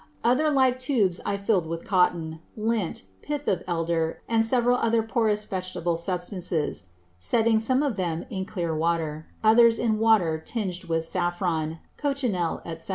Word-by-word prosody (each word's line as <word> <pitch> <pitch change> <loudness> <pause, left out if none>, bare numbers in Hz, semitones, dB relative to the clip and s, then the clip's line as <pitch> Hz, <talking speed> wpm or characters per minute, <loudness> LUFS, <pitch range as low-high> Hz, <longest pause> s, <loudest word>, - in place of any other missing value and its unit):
Other 255 +6 +3
like 260 -3 +3
Tubes 225 -9 +1
I 200 - 0
fill'd 200 -4 +1
with 165 +1 -5
Cotton, 170 -4 +1 0.2
Lint, 215 -4 -1 0.2
Pith 295 -1 -4
of 180 -3 +1
Elder, 165 -1 -1
and 225 -1 +3
several 245 +1 +3
other 230 0 +2
porous 215 -2 0
Vegetable 185 -2 -2
Substances; 170 - -2 0.3
setting 225 - +2
some 255 +5 +1
of 270 -8 -1
them 170 -3 -2
in 190 -3 -3
clear 170 -5 -3
Water; 160 -1 -1 0.2
others 225 +1 +6
in 220 -2 0
Water 205 -8 +3
tinged 185 -5 -4
with 165 -1 -1
Saffron, 175 -2 -1 0.2
Cochinele, 250 - -1
_&c. 165 +1 -6
190 Hz, 150 wpm, -26 LUFS, 165-230 Hz, 0.3 s, others